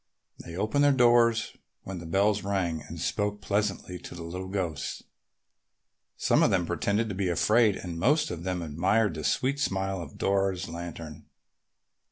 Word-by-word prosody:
They 85 - -8
opened 110 +9 +1
their 145 - +6
doors 120 -3 +4 0.3
when 95 -2 -6
the 85 - -8
bells 100 +4 +2
rang 90 -5 -1
and 80 +3 -9
spoke 105 +4 -1
pleasantly 100 -3 -2
to - - -10
the 85 - -7
little 90 +3 -5
ghosts. 90 -7 -3 1.1
Some - - +3
of - - +5
them 90 -3 +2
pretended 100 +7 0
to - - -3
be 95 -1 -1
afraid 105 +4 +3
and 85 -3 -6
most 150 - +2
of 85 -2 -5
them 90 -1 -2
admired 90 +6 +1
the 80 -1 -6
sweet 135 - +1
smile 95 -6 -1
of 80 - -10
Dora's 95 -2 0
lantern. 85 -2 -8
95 Hz, 165 wpm, -28 LUFS, 85-105 Hz, 1.1 s, their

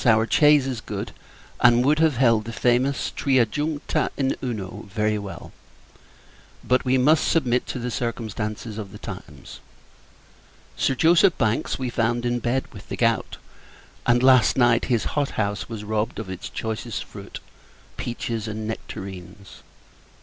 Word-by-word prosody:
Our 110 -2 +4
chaise 150 -1 +5
is 130 -4 -3
good, 100 -2 -5 0.5
and 120 +1 +5
would 150 +2 +3
have 160 -5 +3
held 115 -4 +3
the 115 - -5
famous 125 +3 +1
"Tria 130 -4 +3
juncta 150 +6 -1
in 135 -1 +1
Uno," 105 -4 -5
very 105 +1 0
well: 100 -1 -8 1.1
but, 125 0 +2
we 130 0 +2
must 150 +5 +4
submit 125 -6 +1
to - - -4
the 125 0 -3
circumstances 110 -2 -4
of 100 -3 -7
the - - -8
times. - - -10 1.2
Sir 135 - +1
Joseph 165 +4 +4
Bankes 110 -2 0
we 130 -2 -3
found 120 +1 0
in 120 0 0
bed 125 +3 -1
with 100 - -12
the - - -4
gout: 115 -3 +1 0.7
and, 120 0 +4
last 130 -2 +5
night, 120 -2 +4
his 120 -4 +1
hot 145 -2 0
house 100 0 -1
was 110 -2 -6
robbed 110 +1 -2
of 105 -3 -5
its 95 - -6
choicest 110 0 -4
fruit - - -10 0.6
peaches 115 -2 -4
and 110 0 -4
nectarines. 95 -3 -8
120 Hz, 150 wpm, -24 LUFS, 110-130 Hz, 1.2 s, chaise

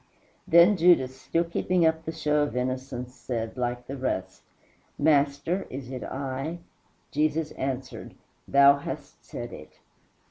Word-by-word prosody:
Then 170 +5 +6
Judas, 165 -7 +4
still 165 - +1
keeping 170 +1 +1
up 160 0 +1
the 160 - -2
show 150 -2 +1
of 145 -5 -1
innocence, 125 0 -3
said, 115 -3 -4
like 120 -1 -2
the 135 - -6
rest, 130 -8 -3 0.6
"Master, 145 +5 +2
is 130 -1 -7
it 130 - -5
I?" 135 +4 -4 0.5
Jesus 155 +1 0
answered, 130 -1 -5 0.3
"Thou 140 0 +6
hast - - -8
said - - -7
it." - - -12
140 Hz, 135 wpm, -27 LUFS, 130-160 Hz, 0.6 s, Then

